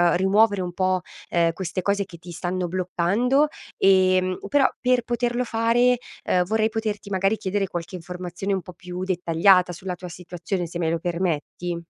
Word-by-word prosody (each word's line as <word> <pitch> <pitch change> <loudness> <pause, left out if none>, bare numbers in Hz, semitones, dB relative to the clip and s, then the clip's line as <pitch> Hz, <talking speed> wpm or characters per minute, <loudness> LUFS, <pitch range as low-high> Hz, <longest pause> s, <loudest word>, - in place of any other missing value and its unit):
rimuovere 200 +2 +3
un 175 -1 -4
po', 185 0 +1 0.3
ehm, 170 -1 +2
queste 185 0 -3
cose 200 +1 0
che 175 -3 -12
ti 175 +1 -10
stanno 175 +2 -2
bloccando. 185 - +1 0.3
Ehm, 185 -1 +4
però 280 -2 +4
per 250 -1 +2
poterlo 240 +1 0
fare, 235 +2 +3 0.3
ehm 180 - +2
vorrei 220 +2 +1
poterti 215 -2 -3
magari 195 +3 +1
chiedere 195 0 -1
qualche 175 +1 -5
informazione 180 +2 -4
un 190 - -1
po' 180 +1 -11
più 180 +1 -7
dettagliata 180 0 +3
sulla 180 +1 -5
tua 180 0 -9
situazione, 175 +1 -4
se 170 - -6
me 165 -2 +1
lo 165 - 0
permetti. 170 0 -2
185 Hz, 165 wpm, -24 LUFS, 175-205 Hz, 0.3 s, Ehm